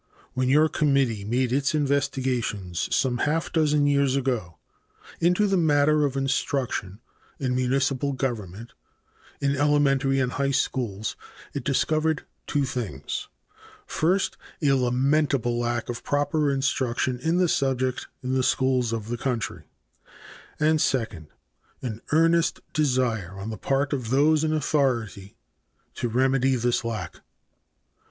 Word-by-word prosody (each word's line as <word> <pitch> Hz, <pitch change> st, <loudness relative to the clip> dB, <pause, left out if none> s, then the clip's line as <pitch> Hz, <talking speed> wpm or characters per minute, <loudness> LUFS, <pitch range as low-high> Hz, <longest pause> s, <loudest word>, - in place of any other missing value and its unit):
When 130 Hz, 0 st, 0 dB
your 150 Hz, +4 st, +5 dB
committee 135 Hz, -9 st, +1 dB
made 120 Hz, +4 st, 0 dB
its 140 Hz, +2 st, +1 dB
investigations 130 Hz, -, -1 dB
some 125 Hz, -2 st, +1 dB
half 160 Hz, +5 st, 0 dB
dozen 150 Hz, -2 st, +3 dB
years 140 Hz, -2 st, +2 dB
ago 125 Hz, -11 st, -2 dB, 0.6 s
into 180 Hz, +5 st, +3 dB
the 195 Hz, -1 st, +2 dB
matter 150 Hz, -2 st, +3 dB
of 140 Hz, -1 st, -2 dB
instruction 135 Hz, -7 st, -1 dB, 0.4 s
in 130 Hz, -2 st, -1 dB
municipal 135 Hz, +2 st, +1 dB
government 115 Hz, -4 st, -4 dB, 0.7 s
in 140 Hz, 0 st, +1 dB
elementary 140 Hz, -1 st, +2 dB
and 130 Hz, -1 st, 0 dB
high 140 Hz, +1 st, 0 dB
schools, 110 Hz, -7 st, -2 dB, 0.4 s
it 140 Hz, -, -4 dB
discovered 155 Hz, +3 st, +1 dB, 0.2 s
two 145 Hz, -2 st, +1 dB
things: 110 Hz, -, -4 dB, 0.6 s
First, 185 Hz, +5 st, 0 dB, 0.2 s
a 145 Hz, -4 st, +2 dB
lamentable 130 Hz, -1 st, +1 dB
lack 120 Hz, -1 st, -1 dB
of 120 Hz, -1 st, -5 dB
proper 145 Hz, +1 st, +1 dB
instruction 130 Hz, -2 st, 0 dB
in 160 Hz, +5 st, 0 dB
the 180 Hz, -1 st, +3 dB
subject 130 Hz, -4 st, 0 dB, 0.2 s
in 130 Hz, +1 st, -2 dB
the 130 Hz, -, +2 dB
schools 130 Hz, -2 st, +1 dB
of 110 Hz, -2 st, -3 dB
the 120 Hz, 0 st, -3 dB
country, 125 Hz, -4 st, -3 dB, 0.9 s
and 155 Hz, 0 st, +3 dB
second, 110 Hz, -, -1 dB, 0.6 s
an 115 Hz, -3 st, -4 dB
earnest 165 Hz, +1 st, +3 dB
desire 125 Hz, -, 0 dB
on 100 Hz, +3 st, -5 dB
the -, -, -4 dB
part 140 Hz, +1 st, 0 dB
of 125 Hz, -5 st, -3 dB
those 150 Hz, +4 st, +3 dB
in 155 Hz, -, +1 dB
authority 125 Hz, -10 st, -1 dB, 0.6 s
to 120 Hz, -, -3 dB
remedy 130 Hz, +2 st, +2 dB
this 120 Hz, 0 st, 0 dB
lack. 115 Hz, -2 st, -4 dB
135 Hz, 130 wpm, -25 LUFS, 120-145 Hz, 0.9 s, your